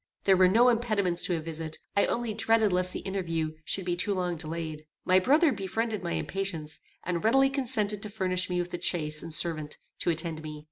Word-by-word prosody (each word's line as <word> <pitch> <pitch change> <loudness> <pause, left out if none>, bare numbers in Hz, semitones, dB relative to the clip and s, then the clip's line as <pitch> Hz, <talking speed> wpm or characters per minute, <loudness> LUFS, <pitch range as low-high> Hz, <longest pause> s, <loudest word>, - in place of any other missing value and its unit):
There 195 - +5
were 185 0 +6
no 235 +6 +5
impediments 215 -7 +1
to 175 - 0
a - - -3
visit: 160 0 -5 0.2
I 200 - +3
only 235 -2 -1
dreaded 220 -2 +2
lest 180 0 +3
the - - -4
interview 165 -5 -2
should 190 +3 -1
be 175 -1 0
too 200 +3 +1
long 180 -2 -1
delayed. 155 -1 -5 0.2
My 185 0 +5
brother 295 - +4
befriended 220 +1 -2
my 170 -1 -3
impatience, 175 -6 -3 0.2
and 175 -1 -2
readily 270 +5 +4
consented 225 -7 0
to 215 - -5
furnish 185 -3 0
me 180 - -1
with 175 0 -4
a 175 - -4
chaise 155 -4 +1
and 165 - -8
servant 155 -2 -1 0.2
to - - 0
attend 160 -1 -2
me. 155 -1 -7
185 Hz, 205 wpm, -28 LUFS, 165-215 Hz, 0.2 s, were